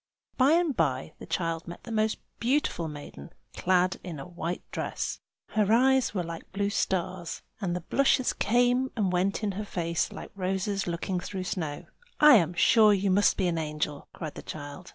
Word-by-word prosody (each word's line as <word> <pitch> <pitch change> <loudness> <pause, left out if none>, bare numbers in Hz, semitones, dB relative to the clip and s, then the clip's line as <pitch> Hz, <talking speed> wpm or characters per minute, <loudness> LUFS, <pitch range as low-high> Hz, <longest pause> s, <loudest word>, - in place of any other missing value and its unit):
By 270 +4 +5
and 335 -5 +2
by 140 -3 0
the - - -9
child 165 -2 -2
met 175 - -8
a - - -5
most 220 0 +1 0.2
beautiful 240 - 0
maiden, 145 - -9 0.2
clad 185 0 +2
in 170 -5 -6
a 135 - -7
white 175 0 -4
dress. - - -3 0.3
Her 215 -1 +1
eyes 260 +2 +4
were 185 -4 -2
like 165 0 -8
blue 200 +1 -1
stars, 185 -3 -2 0.2
and 180 -5 -1
the 180 - -3
blushes 260 +6 +2
came 245 +4 +2
and 200 -5 +1
went 190 +4 0
in 205 - +1
her 200 +3 -4
face 170 -4 -1
like - - -9
roses 195 +1 -1
looking 175 +2 -2
through 185 +1 -5
snow. 160 -5 -4 0.3
"I 300 -4 +9
am 175 -2 0
sure 215 +3 +6
you 195 0 +1
must 205 +2 +4
be 190 - +1
an 170 -2 0
angel!" 150 -2 -3
cried 155 -3 -6
the - - -8
child. 145 +4 -8
185 Hz, 185 wpm, -28 LUFS, 170-215 Hz, 0.3 s, I